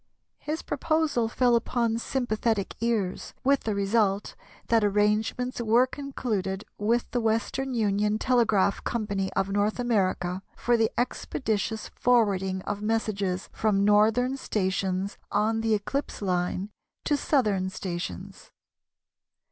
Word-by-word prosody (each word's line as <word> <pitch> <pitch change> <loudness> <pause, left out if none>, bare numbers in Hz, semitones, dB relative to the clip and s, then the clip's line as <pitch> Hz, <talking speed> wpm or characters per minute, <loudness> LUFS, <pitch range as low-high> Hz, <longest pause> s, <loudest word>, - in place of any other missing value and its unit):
His 305 +2 -4
proposal 300 -5 0
fell 245 +1 +3
upon 230 -1 0
sympathetic 225 -5 -1
ears, 225 -6 -1
with 275 +1 +2
the 215 -2 0
result 200 0 +1 0.3
that 230 -2 +3
arrangements 210 +5 +1
were 235 +2 +4
concluded 225 -8 -3
with 230 +3 0
the 245 - 0
Western 230 +4 -1
Union 210 -1 +1
Telegraph 220 -5 +2
Company 200 -4 -2
of 195 0 0
North 205 +2 +1
America 190 -6 0 0.2
for 240 - +2
the 225 -1 +2
expeditious 220 -3 -2
forwarding 195 -6 +1
of 205 0 -4
messages 205 -4 -1
from 200 -2 +1
northern 220 +6 +3
stations 190 -3 -1
on 220 +2 +1
the 225 -1 +2
eclipse 275 +7 -3
line 185 +1 -1 0.3
to 295 - +2
southern 210 -11 +1
stations. 175 - -6
215 Hz, 115 wpm, -27 LUFS, 200-240 Hz, 0.3 s, were